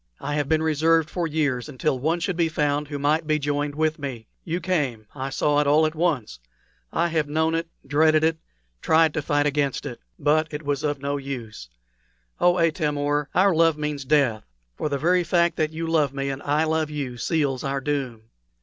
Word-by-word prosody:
I 145 - -4
have 145 -2 -1
been 160 0 +2
reserved 160 +1 +2
for 175 -2 -1
years 145 -4 -1
until 135 0 -1
one 160 +6 0
should 180 +2 -2
be 165 -1 +1
found 150 -1 0
who 145 0 -4
might 150 +3 +1
be 155 -1 +2
joined 145 0 -2
with 155 +1 0
me. 130 -6 -6 0.2
You 170 +1 -2
came. 145 -11 -1
I 135 -1 -4
saw 145 +2 +1
it 150 - +1
all 150 +2 +5
at 155 - -1
once. 150 - -1 0.5
I 170 +1 +1
have 160 -3 0
known 160 +2 +1
it 165 0 -1 0.2
dreaded 155 +1 +3
it 160 0 +1 0.4
tried 160 -1 +4
to 155 - -1
fight 145 0 +1
against 145 -2 0
it. 125 -4 -6 0.2
But 155 +2 +2
it 150 +1 -5
was 145 -2 -2
of 145 -2 -2
no 140 +1 -1
use. 120 - -7 0.7
Oh, 175 0 +4
Atam 160 -3 +1
or, 145 0 0
our 190 +1 +4
love 165 -1 +3
means 150 -2 -3
death; 135 -6 +2 0.3
for 150 - -2
the 140 - -1
very 180 +5 +2
fact 170 +1 +2
that 155 -1 0
you 165 +1 -4
love 155 -4 +1
me 140 0 -2
and 135 +1 -6
I 150 +2 +1
love 160 -1 0
you 140 -5 -4
seals 140 -2 0
our 140 0 -1
doom!" 135 -5 -3
150 Hz, 205 wpm, -24 LUFS, 140-160 Hz, 0.7 s, all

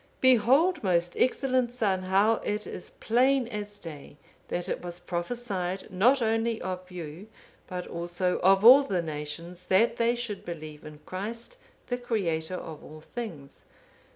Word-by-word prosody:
'(507) 260 - +8
"Behold, 275 - +3
most 175 -2 +1
excellent 255 -1 +1
son, 195 -6 +1
how 195 +4 +3
it 210 +1 -3
is - - -7
plain 255 +2 +2
as 205 -2 -6
day 150 -5 -10 0.3
that 175 - -3
it - - -2
was 175 -1 -6
prophesied 185 +1 -3
not 240 +8 +4
only 225 0 +1
of 185 0 -5
you, 175 +2 -8 0.4
but 180 -1 -5
also 175 +2 -1
of 195 +3 +4
all 260 +4 +11
the 190 -10 -1
nations, 165 +3 -6
that 200 +5 +3
they 235 +1 +2
should 235 -4 -4
believe 155 -3 -8
in 150 0 -10
Christ, 230 - -6 0.3
the 245 0 -3
Creator 185 -8 -1
of 160 -4 -8
all 155 +1 -11
things. 160 - -8
190 Hz, 155 wpm, -28 LUFS, 175-235 Hz, 0.4 s, all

